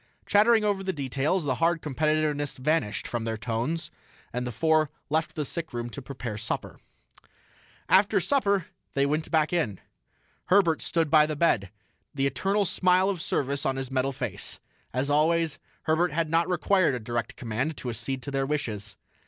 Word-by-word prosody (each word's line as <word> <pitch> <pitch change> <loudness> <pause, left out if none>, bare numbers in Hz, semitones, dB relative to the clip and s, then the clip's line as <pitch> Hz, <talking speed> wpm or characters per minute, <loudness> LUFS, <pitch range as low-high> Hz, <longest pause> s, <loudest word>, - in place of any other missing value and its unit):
Chattering 220 +2 +5
over 205 -2 +1
the 190 0 -2
details, 140 +5 0
the 130 -3 -1
hard 165 0 +2
competitiveness 150 0 0
vanished 130 -6 0
from 120 -2 -3
their 115 -1 -2
tones, 120 +9 -2 0.4
the 125 0 -2
four 155 +4 +2 0.2
left 160 +1 0
the 150 - -2
sickroom 120 -7 -4
to 140 - -7
prepare 120 -5 -6
supper. 110 - -4 1.1
After 200 +1 +5
supper 200 - +1 0.3
they 140 0 +3
went 150 +2 -1
back 155 0 +2
in. 130 - 0 0.7
Herbert 175 -4 +4
stood 165 -3 0
by 155 -1 +6
the 155 - -2
bed, 115 - +2 0.5
the 135 -1 +1
eternal 195 +10 +1
smile 185 +1 +3
of 180 -5 -4
service 140 -2 -1
on 135 - 0
his 135 -1 -4
metal 135 +1 +1
face. 125 -7 -4 0.3
As 130 +3 -1
always, 160 +1 +2 0.2
Herbert 160 +1 +2
had 160 +1 -1
not 165 +2 +2
required 180 -3 +2
a - - -3
direct 120 +1 -3
command 125 +6 -2
to 125 - -4
accede 130 +3 -4
to 140 - -5
their 135 -1 0
wishes. 105 -8 -3
150 Hz, 165 wpm, -27 LUFS, 130-170 Hz, 1.1 s, by